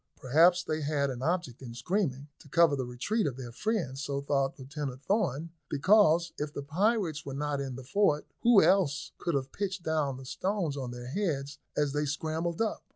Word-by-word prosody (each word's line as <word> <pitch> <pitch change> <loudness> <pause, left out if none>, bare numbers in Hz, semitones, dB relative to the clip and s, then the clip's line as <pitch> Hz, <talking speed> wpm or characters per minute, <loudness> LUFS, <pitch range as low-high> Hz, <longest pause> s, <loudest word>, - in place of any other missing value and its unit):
Perhaps 170 +7 +4
they 155 -2 -2
had 140 -2 0
an 125 -1 -6
object 165 -5 -1
in 120 -3 -8
screaming, 145 - -1
to 145 - -16
cover 165 0 +5
the 130 -3 -3
retreat 195 - -1
of 130 -3 -4
their 125 -3 -7
friends; 170 - -2
so 140 -1 -2
thought 140 -1 0
Lieutenant 135 -1 -6
Thorn, 170 - 0 0.2
because 170 +1 +4
if 150 0 -2
the 145 - -5
pirates 170 0 0
were 135 -1 -6
not 145 0 -1
in 135 -2 -4
the 130 - -8
fort, 150 0 +2 0.2
who 235 -6 +6
else 170 -4 +2
could 170 -4 -1
have 135 -1 -2
pitched 195 -3 -3
down 150 -5 0
the 130 - -10
stones 185 +1 -1
on 130 -3 -4
their 120 0 -7
heads 145 -6 -2 0.2
as 145 -2 +1
they 150 0 0
scrambled 160 +6 -1
up? 220 - -3
150 Hz, 195 wpm, -30 LUFS, 135-175 Hz, 0.2 s, who